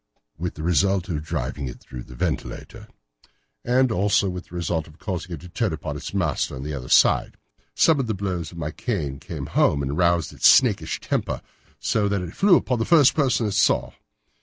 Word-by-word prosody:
"With 85 +3 -4
the 75 - -7
result 95 +2 +1
of 75 -4 -2
driving 75 -3 -4
it 60 - -8
through 60 -1 -10
the 60 - -12
ventilator." - - -4 0.8
"And 125 +1 +2
also 100 0 +2
with 90 0 -7
the 90 - -12
result 85 -2 -2
of 75 0 -17
causing 90 -3 -5
it 80 - -7
to 90 - -10
turn 105 +3 -1
upon 75 -2 -5
its 75 - -6
master 90 -7 -1
at 65 - -7
the 75 +1 -4
other 65 -3 -6
side. - - +4 0.4
Some 160 -3 +4
of 130 - -1
the 110 - -1
blows 90 -4 -3
of 85 - -12
my 75 -2 -3
cane 80 - -3
came - - -6
home 70 -1 +2
and 70 +1 -2
roused 85 -1 +1
its - - +4
snakish - - +4
temper, - - -2 0.4
so 105 -2 +1
that 100 -2 -1
it 90 0 -8
flew 195 -2 +5
upon 125 -7 0
the - - +1
first 145 -1 +5
person 130 -6 +1
it 105 - -1
saw. 105 +1 +2
90 Hz, 210 wpm, -23 LUFS, 75-105 Hz, 0.8 s, flew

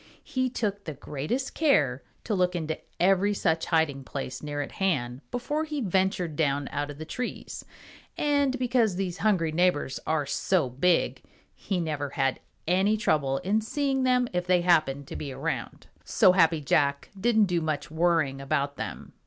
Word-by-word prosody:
He 255 0 -1
took 205 -4 -3
the 155 - -5
greatest 150 - -3
care 145 - +2 0.2
to 215 - -2
look 180 -2 +1
into 160 -2 -3 0.2
every 195 +3 +3
such 165 -4 0
hiding 160 -5 +1
place 135 -1 -5
near 145 -1 -4
at - - -9
hand 135 -10 -1
before 290 +6 -2
he 305 -2 -4
ventured 190 - 0
down 145 -2 0
out 145 0 -2
of 145 - -8
the 160 - -7
trees, 250 +9 -5 0.5
and 285 -3 +2
because 240 -5 +2
these 185 -1 -3
hungry 185 -7 +2
neighbors 160 -5 +1
are 155 -2 +1
so 140 0 0
big, 165 +7 +1 0.3
he 190 -3 -3
never 150 -4 -2
had 135 -1 0 0.3
any 190 +5 +3
trouble 145 -10 +1
in 210 +4 +1
seeing 270 +3 -1
them 250 -1 +3
if 180 0 -1
they 180 -1 +4
happened 155 -6 +2
to - - -8
be 140 - -5
around. - - -4 0.2
So 185 - +5
Happy 165 -4 +3
Jack 140 0 +1
didn't 220 +2 +3
do 175 -3 0
much 150 -2 -3
worrying 160 -5 +1
about 140 +1 -1
them. - - -6
175 Hz, 170 wpm, -27 LUFS, 145-205 Hz, 0.5 s, So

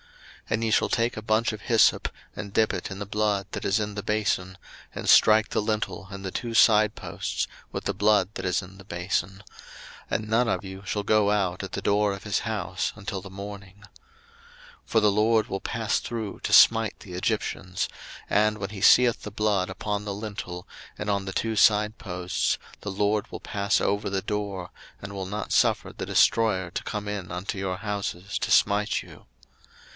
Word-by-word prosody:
02:012:022 - - 0
And 115 - -4
ye 110 - 0
shall - - +3
take 115 +1 +1
a 110 - -5
bunch 110 +1 +1
of 105 - -7
hyssop, 115 0 +3 0.3
and 100 - -6
dip 110 +1 +2
it - - -4
in 95 - -6
the 100 - -4
blood 105 -1 0
that - - -5
is 100 +3 +2
in 105 -1 -3
the 105 - -4
bason, 105 -3 -1 0.4
and - - -6
strike 110 0 +6
the - - 0
lintel 105 -3 -2
and 100 -1 -8
the 95 - -3
two 115 +2 -4
side 105 -2 +5
posts - - -3 0.2
with - - -5
the - - 0
blood 105 -1 +2
that - - -6
is 90 0 +1
in 95 +1 -13
the 100 - -12
bason; 95 +1 -3 0.7
and 110 - -1
none 115 +2 +2
of 105 - -1
you 95 0 -8
shall 105 +3 -2
go 105 0 +3
out 95 -4 0
at - - -6
the - - -3
door 105 0 +2
of 100 - -8
his 105 -2 0
house 110 -6 -2
until 100 -1 -5
the 95 - -10
morning. 100 +1 -9 1.0
02:012:023 - - -37
For 115 - +3
the 105 -1 +4
LORD 110 +2 +3
will 95 -3 -4
pass 110 -3 -1
through 110 -4 -5
to - - -3
smite 115 -1 +6
the 90 - -11
Egyptians; 90 0 -2 0.4
and 105 +1 +3
when 100 -1 -5
he 100 -3 -7
seeth 120 +3 +6
the 105 - -7
blood 100 -3 +1
upon 100 +2 -3
the 105 -1 -4
lintel, 100 -4 -6 0.3
and - - -4
on 100 -1 0
the 95 - -4
two 115 +2 -1
side 105 +1 +4
posts, 90 -5 -1 0.2
the 105 - -4
LORD 105 +1 0
will - - -6
pass 100 0 0
over 100 +1 0
the 95 -1 -2
door, 100 -3 -3 0.3
and 100 0 -8
will 95 -1 -4
not 105 +2 -4
suffer - - +2
the - - -6
destroyer 95 -6 +3
to - - -4
come 105 -1 -4
in 100 -4 -4
unto 90 +4 -4
your 95 -1 -2
houses 100 -2 -3
to - - -2
smite 105 0 +3
you. - - -15
105 Hz, 200 wpm, -26 LUFS, 95-110 Hz, 1.0 s, strike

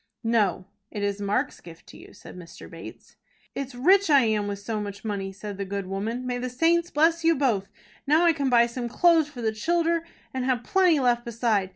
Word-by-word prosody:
"No 210 -5 +1 0.2
it 205 - -5
is 200 0 -2
Mark's 210 +7 -1
gift 165 -1 -14
to - - -13
you," - - -14
said - - -13
Mr. 175 -2 -11
Bates. - - -12 0.4
"It's 275 -2 -6
rich 375 +9 +4
I 285 -2 +6
am 215 -3 0
with 200 0 -3
so 210 +2 -4
much 205 +1 -7
money," 195 -2 -3
said 200 0 -8
the - - -1
good 200 0 -4
woman. 215 +6 -4
"May 245 -1 -2
the 255 +1 -3
saints 335 +6 +1
bless 330 +2 +2
you 330 0 +4
both! 230 -8 0 0.4
Now 315 +4 +4
I 335 - +5
can 280 -3 -1
buy 235 -1 +5
some 240 0 -5
clothes 330 +3 +3
for 250 -5 -9
the 220 - +1
childer, 335 +7 0 0.3
and 260 -1 -2
have 250 -2 0
plenty 360 -1 +3
left 240 -2 +1
beside. 225 -5 0
240 Hz, 215 wpm, -25 LUFS, 205-295 Hz, 0.4 s, I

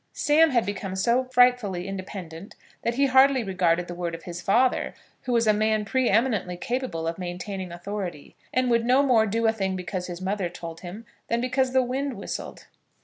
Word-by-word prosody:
Sam 315 +2 +4
had 240 -5 +2
become 195 -1 -4
so 235 +6 +2
frightfully 245 -8 +2
independent 190 -2 -7 0.3
that 235 - -1
he 280 +2 +3
hardly 265 -1 +5
regarded 180 -3 +1
the 175 - -6
word 175 -1 -3
of 165 - -11
his 175 0 -7
father, 245 +6 +2 0.3
who 250 - -2
was 235 -1 +3
a 215 - +5
man 215 0 +1
pre 260 +4 +1
eminently 210 -5 +1
capable 235 -6 -3
of 165 +2 -3
maintaining 185 +1 -5
authority, 175 -3 -6 0.2
and 255 -1 +1
would 235 -1 +3
no 255 +4 +4
more 235 -5 +4
do 225 +3 0
a 225 - +5
thing 195 -3 -2
because 180 0 -4
his 175 -1 -6
mother 190 -1 -2
told 165 -1 -8
him 190 +6 -8 0.2
than 235 - 0
because 255 +1 0
the 260 -1 +4
wind 265 +2 -2
whistled. 200 - -6
210 Hz, 195 wpm, -25 LUFS, 180-250 Hz, 0.3 s, hardly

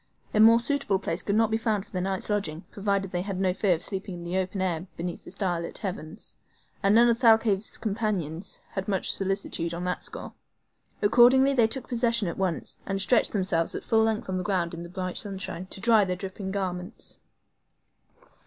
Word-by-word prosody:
A 215 - +2
more 225 +2 +8
suitable 235 -5 0
place 170 -2 -2
could 200 - -1
not 225 0 +3
be 220 - +2
found 215 -3 -1
for - - -19
their 185 - -2
night's 190 0 -2
lodging, 185 -5 -2
provided 200 -2 -1
they 175 - -1
had 195 -1 -4
no 185 -1 +2
fear 190 -1 +2
of 160 - -7
sleeping 195 -1 -3
in 175 - -8
the 175 +1 -4
open 190 +1 -1
air 180 -1 -1
beneath 175 +1 -5
the - - -11
star 180 -3 -1
lit 170 - -4
heavens; 175 -6 -5 0.4
and 200 0 +4
none 235 +1 +7
of 230 -1 +2
Thalcave's 220 -4 +3
companions 195 -6 -3
had 190 -1 -4
much 195 -3 +1
solicitude 185 -3 -2
on 175 - -5
that 180 0 -2
score. - - -6 0.7
Accordingly 255 +5 +6
they 235 -4 +4
took 255 +2 -4
possession 230 -4 +1
at 170 - -4
once, 185 -4 -2
and 195 0 -2
stretched 220 +5 +3
themselves 185 -5 +2
at - - -4
full 225 -1 +3
length 220 -1 -1
on 185 -1 -2
the 185 - -2
ground 175 -3 0
in 170 - -6
the 170 - -8
bright 185 0 -4
sunshine, 190 -2 -4
to 190 - -4
dry 225 0 +5
their 185 -1 -1
dripping 190 +1 -6
garments. 190 0 -4
195 Hz, 205 wpm, -27 LUFS, 180-220 Hz, 0.7 s, more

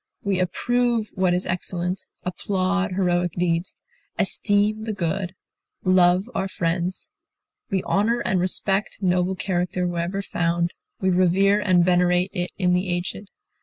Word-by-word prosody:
We 195 -2 0
approve 235 +4 0
what 185 -1 +2
is 180 - -2
excellent, 180 +1 -2 0.2
applaud 190 +1 -1
heroic 175 -2 +1
deeds, 175 0 -1 0.4
esteem 210 +1 +1
the 220 - -2
good, 180 0 -2 0.5
love 185 +1 +4
our 195 - -1
friends. 175 0 -2 0.6
We 190 -2 0
honor 230 +4 +1
and 190 - +1
respect 195 +2 0
noble 180 +1 +2
character 180 -1 -1
wherever 175 +3 -2
found; 170 -1 0 0.3
we 190 -1 +2
revere 185 +3 +3
and 185 -4 +3
venerate 180 +1 +3
it 180 -3 -2
in 180 -2 +2
the 180 +1 0
aged. 175 +3 -3
185 Hz, 130 wpm, -23 LUFS, 175-195 Hz, 0.6 s, love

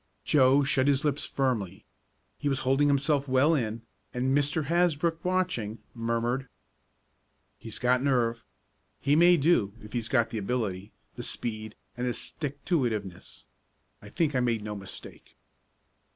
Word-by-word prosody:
Joe 135 0 +5
shut 135 -1 +2
his 140 0 +2
lips 145 -1 0
firmly. 110 -9 -2 0.5
He 145 - 0
was 135 -1 0
holding 135 +3 +3
himself 140 0 +2
well 130 +5 +4
in, 115 -5 -2 0.3
and 130 +2 +1
Mr. 145 +2 +1
Hasbrook, 165 0 +1
watching, 180 - -1 0.2
murmured: 115 +3 -1 1.1
"He's 115 - -5
got 125 +1 +2
nerve. 120 -4 +1 0.6
He 145 - +2
may 175 +2 +6
do, 135 - +2
if 105 0 -11
he's 115 -2 -2
got 120 -3 +2
the 110 - -2
ability, 100 -3 -3 0.3
the - - -4
speed 110 -2 -4 0.2
and 125 +1 -2
the 120 - 0
stick 145 -2 -6
to 170 -7 +2
it 120 -2 +1
iveness. 95 -3 -7 0.6
I 105 - -12
think 155 - 0
I 130 - +2
made 120 -3 0
no 105 0 -5
mistake." 100 -1 -10
130 Hz, 150 wpm, -28 LUFS, 115-145 Hz, 1.1 s, may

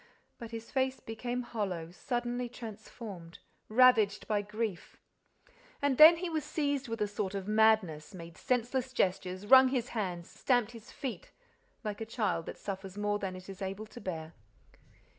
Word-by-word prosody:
But 230 - -7
his 230 0 -8
face 265 0 0
became 245 +2 -4
hollow, 185 -8 -3
suddenly 240 +4 -2
transformed, 215 -6 -9 0.3
ravaged 220 -3 +5
by 210 -2 +1
grief. 210 -2 -4 0.8
And 285 -2 +1
then 320 +2 +11
he 360 +2 -3
was 315 -3 -2
seized 285 -3 -1
with 230 -1 -4
a 210 - +2
sort 205 -1 -3
of 195 0 -4
madness, 210 -6 +3
made 170 -2 -9
senseless 255 +1 -1
gestures, 185 -1 0
wrung 260 +3 +8
his 255 -2 -1
hands, 180 -6 -3
stamped 245 -3 +1
his 230 -1 -12
feet, 275 - -6 0.5
like 210 0 -4
a - - -2
child 210 -8 -1
that - - -6
suffers 195 -1 -6
more 205 0 0
than 190 -2 -3
it 185 0 -10
is 195 -1 -9
able 195 +3 -4
to 235 +2 -12
bear. 160 -3 -5
220 Hz, 160 wpm, -32 LUFS, 195-245 Hz, 0.8 s, then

